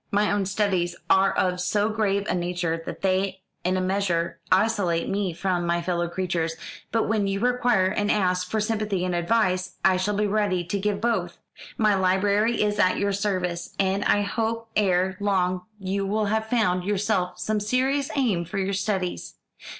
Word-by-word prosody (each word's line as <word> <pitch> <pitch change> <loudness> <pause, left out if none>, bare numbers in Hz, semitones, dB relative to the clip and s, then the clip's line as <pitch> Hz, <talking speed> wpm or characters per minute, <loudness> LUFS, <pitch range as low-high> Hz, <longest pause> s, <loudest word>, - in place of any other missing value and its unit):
My 205 +1 +2
own 205 -2 0
studies 190 -4 0 0.2
are 195 0 +5
of 180 -1 0
so 205 +3 +1
grave 205 -2 0
a - - 0
nature 175 -2 -2
that - - -7
they 190 0 0 0.2
in 185 +1 +1
a - - 0
measure 185 -3 -1
isolate 190 -4 +2
me 195 -1 -1
from 180 +1 -1
my 170 0 +1
fellow 175 -1 -1
creatures, 170 -2 -2 0.4
but 225 - +1
when 210 -2 +1
you 195 0 -1
require 245 -4 +2
and 205 +2 0
ask 180 -2 +1
for 220 - 0
sympathy 210 -4 -1
and 180 - -1
advice, 185 0 +1
I 190 -1 +5
shall 205 +3 -1
be 210 +1 +1
ready 200 -3 +1
to 185 +4 -3
give 205 0 -1
both. 235 0 -1 0.4
My 215 -2 +3
library 200 +4 +2
is 210 0 0
at 185 -2 +3
your 200 0 0
service, 185 -4 -2
and 195 +1 +1
I 205 - +3
hope 225 +2 -2
ere 190 -2 +2
long 185 -3 0
you 195 +1 -2
will 210 +2 0
have 220 +1 -1
found 185 -7 +1
yourself 200 -2 0
some 215 -1 -1
serious 260 +6 0
aim 225 -11 +1
for 185 +4 -6
your 195 0 -1
studies. 190 -2 -2
195 Hz, 180 wpm, -25 LUFS, 185-210 Hz, 0.4 s, are